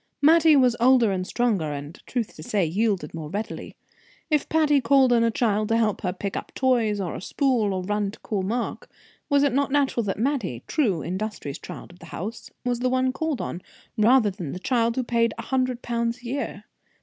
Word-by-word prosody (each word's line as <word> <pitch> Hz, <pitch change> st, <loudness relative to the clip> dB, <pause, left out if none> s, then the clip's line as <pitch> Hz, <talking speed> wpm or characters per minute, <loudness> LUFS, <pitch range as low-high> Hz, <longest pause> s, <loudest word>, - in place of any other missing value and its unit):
Mattie 320 Hz, +1 st, +6 dB
was 250 Hz, -3 st, +4 dB
older 245 Hz, -3 st, +5 dB
and 185 Hz, -1 st, -2 dB
stronger, 210 Hz, -11 st, 0 dB
and, 145 Hz, +3 st, -7 dB
truth 240 Hz, -4 st, -3 dB
to -, -, -10 dB
say, 195 Hz, +3 st, 0 dB
yielded 200 Hz, +4 st, -1 dB
more 160 Hz, -2 st, -6 dB
readily. 205 Hz, +5 st, -5 dB, 0.6 s
If 300 Hz, -2 st, +1 dB
Patty 300 Hz, -3 st, +3 dB
called 260 Hz, 0 st, +4 dB
on 230 Hz, -1 st, +4 dB
a 230 Hz, -, +3 dB
child 215 Hz, -2 st, +1 dB
to 225 Hz, -, +3 dB
help 220 Hz, -3 st, +1 dB
her, 180 Hz, -, -1 dB
to 180 Hz, -, -12 dB
pick 200 Hz, 0 st, -4 dB
up -, -, -5 dB
toys, 235 Hz, -6 st, +2 dB
or 180 Hz, -4 st, -3 dB
a -, -, -6 dB
spool, 245 Hz, -3 st, +1 dB
or 185 Hz, -1 st, -2 dB
run 205 Hz, +1 st, -1 dB
to 200 Hz, -, -11 dB
call 205 Hz, -3 st, -2 dB
Mark, 230 Hz, +6 st, -3 dB, 0.4 s
was 285 Hz, -1 st, +4 dB
it 280 Hz, -4 st, +2 dB
not 280 Hz, +1 st, +1 dB
natural 275 Hz, -4 st, +2 dB
that 195 Hz, -, -2 dB
Mattie, 225 Hz, -, -1 dB
true, 205 Hz, -, 0 dB
industrious 185 Hz, -6 st, -4 dB
child -, -, -9 dB
of 175 Hz, -, -18 dB
the 170 Hz, -, -12 dB
house, 215 Hz, +8 st, -6 dB, 0.2 s
was 245 Hz, -1 st, 0 dB
the 255 Hz, +1 st, +1 dB
one 255 Hz, 0 st, +1 dB
called 315 Hz, -3 st, -2 dB
on, 175 Hz, -, -5 dB, 0.3 s
rather 225 Hz, -1 st, +4 dB
than 180 Hz, -8 st, -6 dB
the -, -, -5 dB
child 230 Hz, +3 st, +1 dB
who 260 Hz, -, 0 dB
paid 230 Hz, -2 st, +1 dB
a -, -, -5 dB
hundred 255 Hz, -2 st, -1 dB
pounds 235 Hz, +1 st, -2 dB
a -, -, -13 dB
year? 240 Hz, -5 st, -4 dB
230 Hz, 215 wpm, -25 LUFS, 195-255 Hz, 0.6 s, Mattie